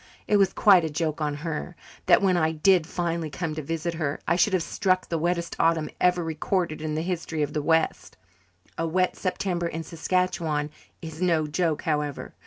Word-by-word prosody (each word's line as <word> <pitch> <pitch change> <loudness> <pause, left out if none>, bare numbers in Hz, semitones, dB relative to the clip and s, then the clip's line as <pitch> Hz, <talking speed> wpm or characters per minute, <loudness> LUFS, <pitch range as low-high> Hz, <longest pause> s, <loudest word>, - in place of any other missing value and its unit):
It 210 - +4
was 195 -1 +3
quite 190 -5 +5
a 160 - -1
joke 155 0 -2
on 150 -1 -1
her 165 +2 -4 0.3
that, - - +5
when 185 -2 +3
I 160 -2 +2
did 165 +1 +3
finally 170 -2 -2
come 165 0 -4
to 155 - -4
visit 165 +3 -3
her, 155 -4 -2
I 170 - +3
should 190 +3 +2
have 185 -3 +2
struck 185 0 0
the 165 - -2
wettest 170 +1 -1
autumn 165 -2 +2
ever 180 -1 +3
recorded 160 0 -2
in 155 -1 -3
the 160 - -1
history 165 -3 -2
of 145 0 -3
the 150 - -1
west. 160 +2 0 0.6
A 165 - 0
wet 185 +3 +1
September 180 -2 -2
in 165 0 -5
Saskatchewan 160 -3 -1 0.3
is 160 +1 -8
no 165 -4 +2
joke, 160 0 -1
however. 150 -3 -2
165 Hz, 190 wpm, -26 LUFS, 155-180 Hz, 0.6 s, quite